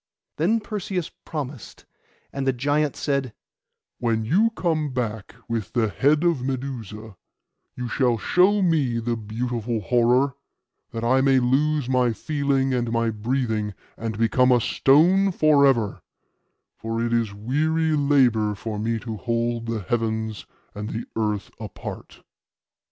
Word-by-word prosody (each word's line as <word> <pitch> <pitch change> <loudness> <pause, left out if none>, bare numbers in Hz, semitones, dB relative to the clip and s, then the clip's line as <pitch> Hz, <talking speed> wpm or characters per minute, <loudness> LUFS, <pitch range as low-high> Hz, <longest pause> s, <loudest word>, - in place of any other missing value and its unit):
Then 200 +9 +2
Perseus 195 -5 -4
promised; 145 -6 -7 0.5
and 135 -1 -3
the 135 - +3
giant 145 +3 0
said, 140 -5 -1 0.7
'When 115 -2 0
you 200 - +3
come 160 -6 0
back 115 -4 -4
with 115 -4 -3
the 115 -3 +1
head 145 +8 +2
of 170 -7 +2
Medusa, 120 -6 -5 0.6
you 125 0 -4
shall 120 -1 +1
show 190 - +3
me 150 -9 +2
the 115 0 -1
beautiful 115 +1 -3
horror, 125 +5 +2 0.6
that 115 - -5
I 130 +3 +3
may 135 0 +4
lose 140 +3 +1
my 125 -2 +2
feeling 140 -1 0
and 120 -2 -1
my 115 -1 +1
breathing, 110 -2 -2 0.2
and 110 -2 -4
become 125 +3 +3
a 125 - +5
stone 175 - +4
for 150 -4 +4
ever; 115 -7 +1 0.7
for 115 0 -4
it 120 - -1
is 115 -4 0
weary 155 +8 0
labour 125 -8 +3
for 105 +1 -5
me 115 +2 -1
to 110 -2 -5
hold 115 0 -2
the 115 -2 -2
heavens 110 0 -2 0.3
and 105 +1 -5
the 115 +1 -4
earth 105 -3 -2
apart. - - -8
125 Hz, 140 wpm, -24 LUFS, 115-145 Hz, 0.7 s, a